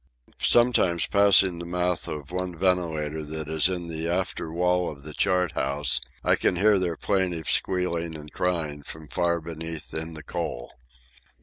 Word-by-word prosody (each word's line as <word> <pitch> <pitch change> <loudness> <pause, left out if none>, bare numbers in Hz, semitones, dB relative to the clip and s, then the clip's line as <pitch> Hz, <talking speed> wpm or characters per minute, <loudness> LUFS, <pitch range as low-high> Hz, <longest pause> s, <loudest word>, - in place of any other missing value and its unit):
Sometimes, 115 -9 +4
passing 100 -3 +5
the 85 - -6
mouth 90 0 -1
of 75 -1 -6
one 90 -1 -3
ventilator 80 -4 0
that 80 0 -6
is 80 +3 +3
in 90 -2 -3
the 80 0 -3
after 85 -2 -2
wall 90 +1 +1
of 70 -2 -10
the 75 +1 -8
chart 90 0 +1
house, 70 0 0 0.2
I - - +4
can - - +1
hear 100 +2 +4
their 85 -3 -1
plaintive 90 -5 -1
squealing 85 -3 +1
and 75 -1 -10
crying 80 -5 -2
from 75 +1 -10
far 85 -1 0
beneath 80 -1 -7
in 80 +1 -4
the 80 - -9
coal. - - -5
85 Hz, 165 wpm, -25 LUFS, 80-90 Hz, 0.2 s, passing